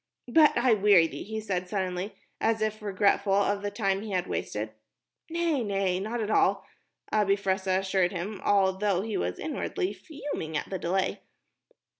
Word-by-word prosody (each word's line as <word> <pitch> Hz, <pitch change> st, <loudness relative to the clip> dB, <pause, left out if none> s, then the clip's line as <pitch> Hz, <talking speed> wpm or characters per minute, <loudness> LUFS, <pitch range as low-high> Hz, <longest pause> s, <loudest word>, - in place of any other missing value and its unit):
"But 300 Hz, +4 st, +5 dB
I 240 Hz, -1 st, +4 dB
weary 200 Hz, -5 st, +6 dB
thee," -, -, -6 dB
he 220 Hz, +1 st, -4 dB
said, 185 Hz, -4 st, -3 dB
suddenly, 185 Hz, 0 st, -2 dB, 0.2 s
as 225 Hz, 0 st, +1 dB
if 215 Hz, 0 st, -2 dB
regretful 200 Hz, -1 st, +2 dB
of 200 Hz, 0 st, +2 dB
the 205 Hz, -, -2 dB
time 195 Hz, -2 st, 0 dB
he 215 Hz, -, -7 dB
had 185 Hz, -2 st, 0 dB
wasted. 110 Hz, -8 st, -3 dB, 0.6 s
"Nay, 335 Hz, -4 st, 0 dB
nay, 195 Hz, -3 st, 0 dB
not 220 Hz, +5 st, -3 dB
at 215 Hz, 0 st, -2 dB
all," -, -, +3 dB, 0.5 s
Abi 205 Hz, -2 st, +3 dB
Fressah 190 Hz, -1 st, 0 dB
assured 190 Hz, -2 st, +1 dB
him, 190 Hz, +2 st, -5 dB
although 195 Hz, -1 st, +2 dB
he 220 Hz, -1 st, -3 dB
was 90 Hz, +1 st, -1 dB
inwardly 180 Hz, +4 st, -2 dB
fuming 205 Hz, -, -5 dB
at -, -, -5 dB
the 190 Hz, -, -2 dB
delay. 185 Hz, +3 st, 0 dB
200 Hz, 165 wpm, -28 LUFS, 185-215 Hz, 0.6 s, weary